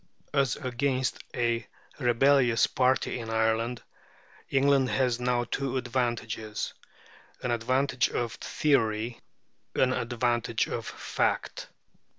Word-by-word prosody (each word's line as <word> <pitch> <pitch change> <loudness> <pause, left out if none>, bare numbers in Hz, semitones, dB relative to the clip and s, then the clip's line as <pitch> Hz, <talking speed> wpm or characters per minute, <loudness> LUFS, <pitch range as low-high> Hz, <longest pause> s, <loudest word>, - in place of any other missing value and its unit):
As 135 -3 +2
against 130 0 -1 0.2
a 120 -1 0 0.3
rebellious 125 -1 +4
party 130 0 +1
in 115 -1 -6
Ireland, 115 +2 0 0.7
England 135 -1 +3
has 125 -3 +1
now 125 -1 +1
two 135 +2 -2
advantages 120 -3 -2 0.7
an 125 - 0
advantage 125 +2 +1
of 120 -2 -2
theory, 115 -5 0 0.6
an 130 0 +3
advantage 120 -1 0
of - - -4
fact. - - -2
125 Hz, 100 wpm, -28 LUFS, 115-130 Hz, 0.7 s, rebellious